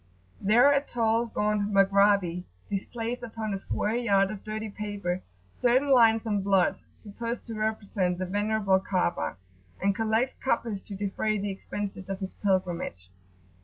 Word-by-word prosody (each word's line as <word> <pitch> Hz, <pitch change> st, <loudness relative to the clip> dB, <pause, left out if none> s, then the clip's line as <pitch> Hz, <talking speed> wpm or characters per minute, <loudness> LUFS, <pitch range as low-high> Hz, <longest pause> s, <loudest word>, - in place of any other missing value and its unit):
There 240 Hz, +8 st, +6 dB
a 280 Hz, -1 st, +3 dB
tall, 230 Hz, -3 st, +1 dB
gaunt 210 Hz, -2 st, 0 dB
Maghrabi 195 Hz, -3 st, +3 dB, 0.3 s
displays 230 Hz, +4 st, -3 dB
upon 220 Hz, -2 st, -4 dB
a 195 Hz, -, -2 dB
square 210 Hz, +2 st, -2 dB
yard 200 Hz, -5 st, +2 dB
of 210 Hz, -2 st, -8 dB
[p.81]dirty 215 Hz, -1 st, -5 dB
paper 200 Hz, -4 st, -3 dB, 0.3 s
certain 255 Hz, -, +2 dB
lines 230 Hz, -3 st, +5 dB
and 205 Hz, -3 st, 0 dB
blots, 195 Hz, -2 st, +2 dB
supposed 230 Hz, +3 st, -6 dB
to 230 Hz, -, -6 dB
represent 210 Hz, -4 st, -1 dB
the 185 Hz, -, -2 dB
venerable 205 Hz, 0 st, +1 dB
Ka'abah, 180 Hz, -, -1 dB, 0.4 s
and 200 Hz, +1 st, +2 dB
collects 225 Hz, +4 st, +1 dB
coppers 230 Hz, -5 st, 0 dB
to 200 Hz, -, -6 dB
defray 205 Hz, +2 st, -1 dB
the 200 Hz, 0 st, -2 dB
expenses 195 Hz, 0 st, -6 dB
of 195 Hz, -, -2 dB
his 190 Hz, -1 st, -5 dB
pilgrimage. 175 Hz, -, -2 dB
205 Hz, 145 wpm, -28 LUFS, 195-225 Hz, 0.4 s, There